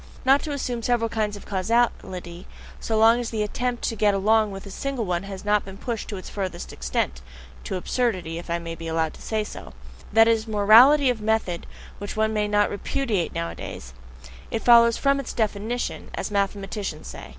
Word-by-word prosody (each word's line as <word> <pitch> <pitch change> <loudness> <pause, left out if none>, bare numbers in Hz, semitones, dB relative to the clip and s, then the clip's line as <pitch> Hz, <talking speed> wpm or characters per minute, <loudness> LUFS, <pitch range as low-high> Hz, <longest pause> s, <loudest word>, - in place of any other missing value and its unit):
Not 270 +2 +5
to 305 - -5
assume 250 -4 -3
several 230 -1 +1
kinds 210 -2 -2
of - - -13
causality, 190 -4 -1 0.3
so 220 - -1
long 225 +2 +6
as 240 -1 -3
the 220 -2 -1
attempt 245 +3 -3
to 225 - -1
get 205 -1 +2
along 215 +2 +3
with 195 0 -8
a 200 - -9
single 270 +1 -3
one 175 -2 -1
has 195 0 -8
not 210 -1 +2
been 195 0 -10
pushed 230 0 -4
to 205 - -5
its 185 - -9
furthest 185 -4 -5
extent 65 0 -2 0.4
(to - - -3
absurdity, 185 -5 -1
if 175 - -11
I 170 - 0
may 165 -1 -6
be 165 0 -7
allowed 160 -1 0
to - - -15
say 220 -1 -1
so): 60 - -9 0.4
that 225 +1 +6
is 225 -1 +2
a - - -9
morality 240 +7 +6
of 230 -3 -5
method 210 -5 -1 0.3
which 205 +1 -6
one 220 0 +1
may 210 -1 0
not 205 0 +2
repudiate 210 -3 -2
nowadays 85 -6 -6 0.6
it 225 - -3
follows 235 -1 +6
"from 275 0 +2
its 275 - -5
definition," 220 +2 -2
as - - -4
mathematicians 200 -4 -2
say. - - -9
210 Hz, 195 wpm, -24 LUFS, 190-230 Hz, 0.6 s, long